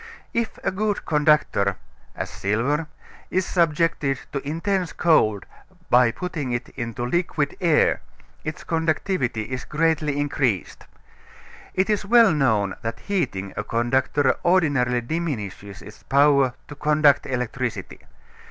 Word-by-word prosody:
If 230 -1 -1
a - - +1
good 205 +2 -2
conductor, 150 - +2 0.4
as - - -5
silver, 130 +10 -1 0.4
is 185 0 0
subjected 165 -5 +1
to 140 - -2
intense 170 +6 -2
cold 110 - +2 0.5
by 125 -1 +6
putting 150 -1 -4
it 120 - -3
into 115 0 -5
liquid 150 0 -1
air, 165 -4 +3 0.4
its 155 0 -5
conductivity 160 - -1
is 130 +3 -5
greatly 150 -2 0
increased. 130 - -1 0.9
It 190 +1 +2
is 210 -2 0
well 230 +1 +6
known 110 -9 +1
that 115 0 -5
heating 120 - -2
a 105 - -3
conductor 120 +6 +1
ordinarily 145 -9 +2
diminishes 115 - -4
its - - -13
power 140 -2 +3
to - - -8
conduct 150 -1 +3
electricity. 125 -1 -3
145 Hz, 120 wpm, -23 LUFS, 120-165 Hz, 0.9 s, by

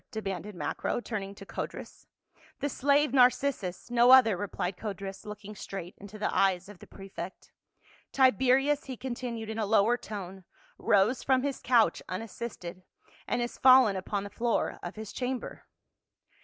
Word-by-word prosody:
demanded 200 -2 -5
Macro, 150 +7 -2
turn 220 -3 -4
ing 195 +1 -8
to 195 - -11
Codrus. - - -7 0.3
" - - -29
The 285 - -1
slave 285 +1 +2
Narcissus, 245 -6 +2
no 240 0 +5
other," 255 -6 +8
replied 190 -1 -3
Codrus, 195 0 -6
looking 210 0 -8
straight 190 -3 -7
into 205 +1 -10
the 210 - -2
eyes 190 -1 +2
of 205 -3 -13
the - - -13
prefect. 190 -2 -9 0.3
" - - -30
Tibe 260 -5 +4
rius," 270 +3 +3
he 260 -2 -6
continued, 240 -3 -5
in 220 - -4
a 215 - 0
lower 220 +3 +4
tone, 195 -4 -8 0.4
"rose 205 +6 +3
from 260 -1 +2
his 280 -1 -2
couch 240 -3 +3
unassisted, 185 -2 -6 0.5
and 240 - 0
is 240 - -6
fallen 255 -5 +7
upon 195 +2 -3
the 205 - -8
floor 235 +2 -1
of 175 - -7
his 220 -1 -8
chamber." 255 0 -4
215 Hz, 165 wpm, -29 LUFS, 195-250 Hz, 0.5 s, other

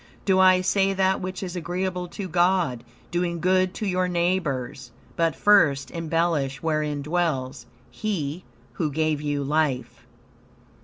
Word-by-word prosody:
Do 190 -1 +3
I 185 -1 +6
say 195 +1 +2
that 190 0 +1
which 185 +1 -5
is 180 -1 -5
agreeable 180 +1 -3
to 190 +2 -6
God 175 -8 +1 0.3
doing 175 -1 -1
good 185 +2 +2
to 215 - -3
your 185 -1 +1
neighbors? 150 -8 -1 0.3
But, 165 -1 +1
first 150 -10 +3
embellish 165 -5 -1
wherein 150 -2 -1
dwells 140 -7 -2 0.2
He, 180 -6 -3 0.3
who 150 +4 -1
gave 155 0 0
you 145 -1 -1
life." 140 -4 -1
170 Hz, 135 wpm, -24 LUFS, 145-185 Hz, 0.3 s, I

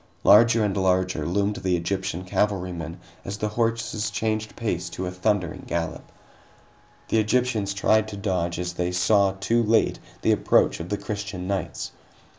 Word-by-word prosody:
Larger 115 +1 +6
and 100 - -1
larger 95 -4 +1
loomed 100 +3 0
the 90 -1 0
Egyptian 95 +1 -3
cavalrymen 90 -4 -2 0.2
as 100 +1 -5
the 105 - -1
horses 115 -1 -1
changed 110 -1 -2
pace 90 -6 -2
to 90 +2 -5
a 90 - -3
thundering 90 -2 -1
gallop. 85 -1 -3 1.0
The 110 - +3
Egyptians 110 -3 +1
tried 110 +2 +3
to 105 -2 -7
dodge, 90 -4 -1
as 90 0 -3
they 90 0 -2
saw, 95 +2 +3
too 115 +5 +1
late, 110 0 +2 0.2
the - - +4
approach - - +3
of 85 +1 -6
the 105 - -1
Christian 100 -3 -5
knights. 100 -1 -3
100 Hz, 155 wpm, -25 LUFS, 90-110 Hz, 1.0 s, Larger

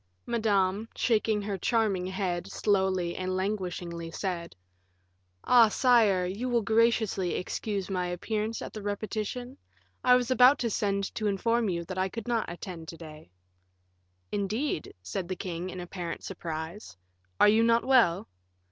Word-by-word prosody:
Madame, 215 -2 +1
shaking 215 -2 +1
her 200 -2 -3
charming 205 -4 +1
head, 185 -1 -3
slowly 190 -4 +1
and 185 0 -2
languishingly 180 -4 -3
said: 170 -1 -4 0.9
"Ah! 240 -2 +7
sire, 220 -6 +4
will - - -1
you 240 +1 0
graciously 220 -4 +2
excuse 200 +1 -3
my 180 -2 -1
appearance 215 +5 -3
at - - -7
the 215 - -6
repetition? 215 +5 -4 0.5
I 250 0 +6
was 250 0 +1
about 255 +2 +7
to 235 -2 -1
send 200 -1 -1
to 215 - -2
inform 230 +3 +1
you 170 -2 -2
that 185 +1 -5
I 190 +1 +1
could 230 +2 -7
not 230 -6 0
attend 175 -2 -8
to 165 - -8
day." 155 - -11 1.0
"Indeed," 205 - -2
said 130 - -4
the 185 - -3
king, 180 0 -5
in 185 - -7
apparent 175 -1 -6
surprise; 165 - -6 0.4
"are 210 - +7
you 220 +2 +4
not 230 0 +3
well?" 230 -9 +4
200 Hz, 145 wpm, -28 LUFS, 180-225 Hz, 1.0 s, Ah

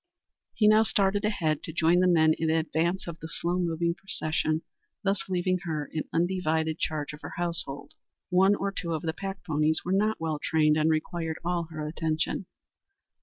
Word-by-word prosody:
He 210 - +4
now 215 +1 +7
started 200 -2 +2
ahead 160 -8 0
to - - -6
join 165 +2 +3
the 185 - +4
men 160 -3 +5
in 160 0 -1
advance 160 +3 0
of 170 -1 -7
the 160 - -7
slow 175 +2 -1
moving 170 -1 0
procession, 155 -3 -1 0.4
thus 195 -1 -1
leaving 185 0 +1
her 155 -4 -3
in 155 - -2
undivided 160 -3 0
charge 150 -2 -2
of 150 - -11
her - - -7
household. 165 -5 -2 0.4
One 190 +3 +5
or 200 0 -2
two 170 -4 -3
of 155 - -4
the 160 -1 -1
pack 195 +1 -6
ponies 155 -1 +1
were 180 - -1
not 215 +3 +2
well 160 -2 -2
trained 155 -1 +3
and 155 +1 +2
required 160 +1 -1
all 175 -1 0
her 155 -2 -5
attention. 160 +3 -1
165 Hz, 180 wpm, -28 LUFS, 155-185 Hz, 0.4 s, now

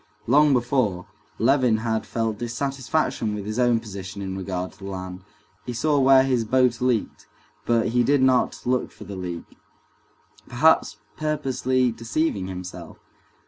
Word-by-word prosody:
Long 145 +5 +5
before, 120 -7 +1 0.3
Levin 125 -1 +3
had 110 0 -2
felt 115 -2 -2
dissatisfaction 130 -2 -1
with 100 -1 -6
his 110 +3 -3
own 120 -2 +3
position 100 -3 -8
in 95 -1 -4
regard 95 -1 -4
to - - -22
the 100 0 -7
land. 95 -1 -6 0.4
He 125 - -5
saw 145 +5 +1
where 135 0 +6
his 130 -3 +1
boat 125 +1 +2
leaked, 125 -4 -1 0.4
but 115 0 +2
he 120 +1 +2
did 135 +2 +3
not 130 -1 +2
look 125 0 0
for - - -12
the 100 0 -8
leak, 90 -2 -7 0.9
perhaps 130 -4 +3 0.2
purposely 130 -4 0
deceiving 115 -3 -2
himself. 90 -1 -8
120 Hz, 145 wpm, -24 LUFS, 100-130 Hz, 0.9 s, where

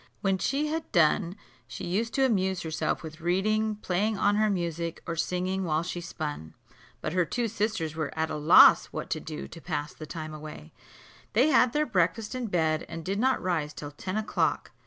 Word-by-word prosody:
When 195 -2 +1
she 280 +8 0
had 315 +1 -3
done, 170 +1 +3 0.3
she - - -7
used 210 +6 -1
to 270 - +4
amuse 190 -6 +1
herself 160 +1 -2
with 155 0 -9
reading, 215 +5 +1
playing 205 +2 -1
on 205 +1 +2
her 215 0 +3
music, 170 -3 -3
or 165 - -3
singing 180 +3 -1
while 160 -2 0
she 175 0 -4
spun. 150 - -6 0.5
But 155 - -3
her 180 -1 +3
two 235 +7 -1
sisters 210 -7 -2
were 155 -3 -2
at 160 0 0
a - - -2
loss 150 +3 +7
what - - -6
to 155 - 0
do 155 0 -7
to 165 - -11
pass 150 -3 -3
the 155 - -9
time 155 -1 -6
away: 150 - -9 0.6
they 250 +8 +4
had 255 -4 +5
their 300 +1 +2
breakfast 210 - 0
in 255 -2 -3
bed, 160 -4 +1
and 165 0 -7
did 195 +2 -1
not 260 +3 +2
rise 160 -5 -1
till 145 -1 -7
ten 185 +7 -4
o'clock. 215 0 0
180 Hz, 200 wpm, -28 LUFS, 160-215 Hz, 0.6 s, loss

